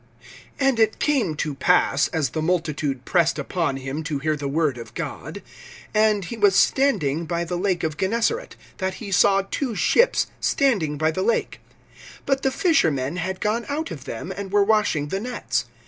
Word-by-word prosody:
V. -, -, -25 dB, 0.4 s
AND 265 Hz, -4 st, +2 dB
it 220 Hz, -1 st, +3 dB
came 255 Hz, -, +1 dB
to 150 Hz, 0 st, -2 dB
pass, 145 Hz, 0 st, +2 dB
as 155 Hz, -6 st, -1 dB
the 155 Hz, -, -2 dB
multitude 155 Hz, -6 st, -1 dB
pressed 170 Hz, -2 st, +2 dB
upon 165 Hz, -7 st, -1 dB
him 135 Hz, +3 st, -4 dB
to 155 Hz, -2 st, -2 dB
hear 155 Hz, +2 st, 0 dB
the 145 Hz, -1 st, -4 dB
word 145 Hz, -3 st, 0 dB
of 115 Hz, -, -10 dB
God, -, -, -6 dB, 0.5 s
and 215 Hz, -2 st, +3 dB
he 235 Hz, -, -6 dB
was 205 Hz, -3 st, +4 dB
standing 180 Hz, -, +2 dB
by 170 Hz, +1 st, -1 dB
the 170 Hz, +1 st, -4 dB
lake 180 Hz, -1 st, 0 dB
of 155 Hz, -2 st, -2 dB
Gennesaret, 230 Hz, -, -1 dB, 0.2 s
(2)that 190 Hz, -1 st, -1 dB
he 205 Hz, -3 st, -8 dB
saw 195 Hz, +1 st, +4 dB
two 255 Hz, -6 st, -2 dB
ships 480 Hz, -, +3 dB
standing 195 Hz, -, +1 dB
by 155 Hz, +2 st, +1 dB
the 185 Hz, -, -3 dB
lake; 230 Hz, +4 st, 0 dB, 0.7 s
but 270 Hz, -1 st, +1 dB
the 265 Hz, -, +2 dB
fishermen 170 Hz, -, +1 dB
had 185 Hz, +2 st, -3 dB
gone 220 Hz, +3 st, -1 dB
out 310 Hz, +3 st, -3 dB
of 140 Hz, -5 st, -8 dB
them, 140 Hz, +9 st, -5 dB
and 200 Hz, -1 st, -6 dB
were 205 Hz, 0 st, +4 dB
washing 200 Hz, -9 st, +1 dB
the 195 Hz, -, -2 dB
nets. 235 Hz, -, -2 dB
180 Hz, 185 wpm, -23 LUFS, 155-220 Hz, 0.7 s, was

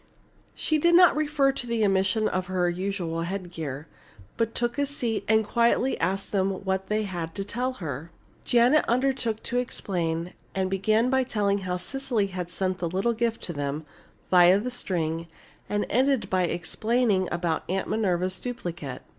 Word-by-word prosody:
She 310 Hz, -1 st, +1 dB
did 340 Hz, +3 st, +4 dB
not 355 Hz, -1 st, +7 dB
refer 295 Hz, -2 st, +2 dB
to 245 Hz, -2 st, -6 dB
the 230 Hz, -2 st, +1 dB
omission 200 Hz, +3 st, +2 dB
of 185 Hz, 0 st, -2 dB
her 185 Hz, -1 st, +1 dB
usual 175 Hz, -2 st, -2 dB
headgear, 170 Hz, -6 st, -5 dB, 0.5 s
but 230 Hz, 0 st, -1 dB
took 240 Hz, +3 st, -1 dB
a 285 Hz, -, +2 dB
seat 230 Hz, -7 st, -2 dB
and 220 Hz, 0 st, +3 dB
quietly 235 Hz, +4 st, +2 dB
asked 195 Hz, +4 st, -1 dB
them 195 Hz, -1 st, 0 dB
what 190 Hz, 0 st, -1 dB
they 215 Hz, +1 st, +1 dB
had 175 Hz, -5 st, -5 dB
to 195 Hz, -, -2 dB
tell 250 Hz, +6 st, -2 dB
her. 155 Hz, -, -6 dB, 0.3 s
Janet 245 Hz, +5 st, +4 dB
undertook 250 Hz, -3 st, 0 dB
to 245 Hz, -, 0 dB
explain, 175 Hz, -7 st, -2 dB, 0.2 s
and 190 Hz, -1 st, 0 dB
began 215 Hz, +5 st, +2 dB
by 265 Hz, 0 st, +3 dB
telling 205 Hz, -5 st, 0 dB
how 180 Hz, -2 st, -2 dB
Cecily 250 Hz, +2 st, -1 dB
had 180 Hz, -2 st, -4 dB
sent 185 Hz, 0 st, -2 dB
the 170 Hz, -, -1 dB
little 195 Hz, +7 st, +1 dB
gift 230 Hz, 0 st, -1 dB
to 170 Hz, -, -4 dB
them, 145 Hz, +1 st, -3 dB, 0.5 s
via 180 Hz, +1 st, +7 dB
the 250 Hz, +4 st, -3 dB
string, 165 Hz, -7 st, -2 dB, 0.4 s
and 205 Hz, 0 st, 0 dB
ended 265 Hz, +1 st, +1 dB
by 185 Hz, -1 st, +3 dB
explaining 200 Hz, +3 st, 0 dB
about 170 Hz, -2 st, -1 dB
Aunt 190 Hz, +1 st, -1 dB
Minerva's 185 Hz, -3 st, +1 dB
duplicate. 175 Hz, -, -5 dB
195 Hz, 165 wpm, -26 LUFS, 180-235 Hz, 0.5 s, not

